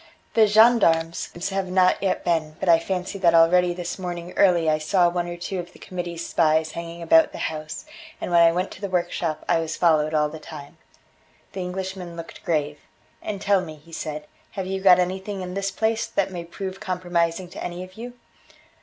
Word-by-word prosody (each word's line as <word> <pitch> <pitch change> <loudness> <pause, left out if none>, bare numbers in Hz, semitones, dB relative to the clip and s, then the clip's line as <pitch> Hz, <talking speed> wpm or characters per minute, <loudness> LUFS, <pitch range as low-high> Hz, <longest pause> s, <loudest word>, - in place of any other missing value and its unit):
"The 220 -2 +5
gendarmes 205 -7 +4 0.2
have 195 -1 -2
not 185 0 +3
yet 195 -1 -1
been, 160 -3 0
but 190 - -3
I 165 -1 +6
fancy 185 +3 -4
that 170 -3 +4
already 175 +2 +5
this 175 +1 -5
morning 175 -1 -5
early 175 -4 +4
I 155 0 +2
saw 175 +3 +3
one 175 0 -2
or 175 0 -6
two 185 +2 -4
of 175 0 -8
the - - -15
Committee's 175 -2 -6
spies 155 -1 +2
hanging 170 +1 -7
about 160 0 +5
the - - -7 0.2
house, 155 - -7 0.3
and - - -4
when 170 - +5
I 165 0 +7
went 180 +3 -2
to - - -11
the 200 - -3
workshop 175 -3 -2
I - - +3
was 165 0 -3
followed 155 -2 +3
all 150 0 +3
the 155 +1 -9
time." 145 -2 -11 0.7
The 190 - -5
Englishman 185 -1 -5
looked 165 0 -9
grave: 150 -2 -1 0.4
"And 205 -2 -4
tell 200 -1 +2
me," 160 -4 -8
he 160 +2 -18
said, 150 -1 -5 0.3
"have 190 -2 -4
you 190 +1 -3
got 185 -2 +7
anything 190 +2 -2
in 180 0 -6
this 195 +1 -1
place 220 +3 -1
that 195 -1 -1
may 175 -2 -6
prove 190 +2 -6
compromising 180 -2 -1
to - - -8
any 175 +1 -5
of 185 0 -12
you?" 240 +4 -8
175 Hz, 205 wpm, -24 LUFS, 165-190 Hz, 0.7 s, I